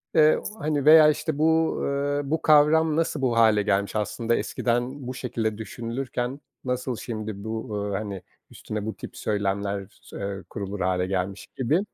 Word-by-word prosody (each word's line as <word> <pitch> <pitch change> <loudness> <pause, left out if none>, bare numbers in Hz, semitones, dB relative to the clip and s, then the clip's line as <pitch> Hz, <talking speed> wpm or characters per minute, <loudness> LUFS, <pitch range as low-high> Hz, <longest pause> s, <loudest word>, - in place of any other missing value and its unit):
eee, 155 -1 +6 0.2
hani, 145 -2 -1
veya, 155 0 +9
işte, 150 0 -1
bu, 160 +1 +3
eee, 145 +1 0
bu 160 - +1
kavram 155 +1 +5
nasıl 160 -2 0
bu 120 -3 +1
hâle 110 -2 +5
gelmiş? 100 0 0
Aslında 115 +2 0
eskiden 125 +3 -1
bu 130 - -3
şekilde 115 -4 -2
düşünülürken 120 +4 -4 0.2
nasıl 125 0 -2
şimdi 110 -3 -5
bu, 110 -1 -4
eee 95 - 0
hani 100 -3 -5 0.3
üstüne 105 -1 -5
bu 110 - -4
tip - - -9
söylemler 100 -1 -1
s - - -11
eee 100 -1 -4
kurulur 100 -1 -5
hâle 90 0 +1
gelmiş 95 +1 -3
gibi. 135 +6 +2
115 Hz, 160 wpm, -25 LUFS, 105-145 Hz, 0.3 s, veya